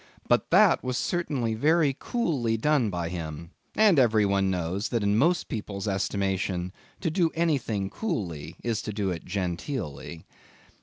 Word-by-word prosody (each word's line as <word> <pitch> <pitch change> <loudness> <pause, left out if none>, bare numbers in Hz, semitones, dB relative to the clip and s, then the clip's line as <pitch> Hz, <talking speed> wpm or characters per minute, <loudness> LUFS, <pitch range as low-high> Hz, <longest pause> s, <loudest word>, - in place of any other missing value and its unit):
But - - +2
that - - +5
was 125 -1 -2
certainly 140 -8 -1
very 150 +4 +3
coolly 140 - 0
done 135 -2 +2
by 85 -3 -3
him, 85 -1 -6 0.2
and 210 -8 +5
every 110 -4 +4
one 100 -1 +2
knows 90 +3 -2
that 115 -4 0
in 100 0 +2
most 170 +10 +2
people's 105 -2 -5
estimation, 95 -2 -1 0.3
to 165 - 0
do 170 0 +2
anything 135 -12 0
coolly 90 - -4
is 115 -3 -1
to 105 - -5
do 100 -2 -1
it 85 -2 -5
genteelly. 90 - -4
105 Hz, 150 wpm, -27 LUFS, 95-140 Hz, 0.3 s, that